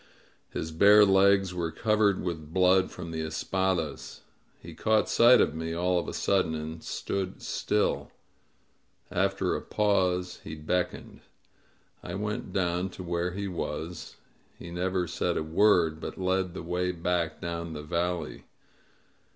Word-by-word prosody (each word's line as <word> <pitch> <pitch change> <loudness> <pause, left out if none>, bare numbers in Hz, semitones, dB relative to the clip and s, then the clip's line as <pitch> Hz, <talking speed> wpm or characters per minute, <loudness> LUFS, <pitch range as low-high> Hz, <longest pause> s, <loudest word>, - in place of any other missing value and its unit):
His 80 - -4
bare 100 +5 +7
legs 95 -1 +4
were 85 -2 -2
covered 105 +1 +1
with 80 -4 -5
blood 95 +1 +4
from 85 -2 -8
the 80 -1 -3
espadas. 80 0 -2 0.4
He 85 - -11
caught 110 +6 +2
sight 120 +1 +6
of - - +2
me 80 +1 -4
all 90 +1 +1
of - - -5
a - - -4
sudden, 95 -5 +1
and 80 +1 -6
stood 95 -1 -4
still; - - -1 1.0
after 95 0 0
a - - -3
pause 90 -4 0
he 80 - -7
beckoned. 90 +4 -3 0.8
I 90 - -6
went 105 -1 -4
down 90 0 0
to 95 - -6
where 85 0 -2
he 100 +1 -3
was; 85 -1 -5 0.4
he 85 - -9
never 90 +1 -1
said 85 +1 -1
a - - -1
word, 80 -1 +3
but - - -6
led 95 -1 -1
the - - -6
way 90 +2 -1
back 85 -1 -1
down 85 -1 -4
the 75 -1 -6
valley. 85 0 -3
90 Hz, 145 wpm, -28 LUFS, 85-95 Hz, 1.0 s, bare